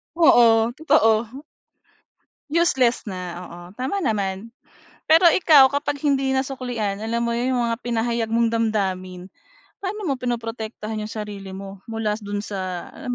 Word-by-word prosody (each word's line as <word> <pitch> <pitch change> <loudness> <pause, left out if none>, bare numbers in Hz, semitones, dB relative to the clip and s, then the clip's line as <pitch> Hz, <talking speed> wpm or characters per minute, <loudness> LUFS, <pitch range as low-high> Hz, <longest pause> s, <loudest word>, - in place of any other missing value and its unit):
Oo, 235 -7 +5
totoo. 235 -3 +2 1.1
Useless 265 -7 +2
na, 190 -4 -6 0.2
oo, 175 0 -11 0.2
tama 265 - -2
naman. 210 - -2 0.5
Pero 325 +3 +6
ikaw 310 -5 +6
kapag 285 +1 -2
hindi 275 -3 +1
nasuklian 250 -6 -2
alam 230 +1 -1
mo 235 0 -1
'yun 250 +2 0
yung 245 - +1
mga 230 - -1
pinahayag 235 -1 -1
mong 230 0 +3
damdamin, 190 -5 -2 0.5
paano 405 +2 -4
mo 275 -7 -1
pinoprotektahan 225 -3 -4
yung 210 - -4
sarili 205 -3 -7
mo 195 0 -9
mula 225 -1 -2
do'n 205 -1 -4
sa, 185 -4 -5
alam 275 - -10
230 Hz, 135 wpm, -22 LUFS, 210-265 Hz, 1.1 s, Pero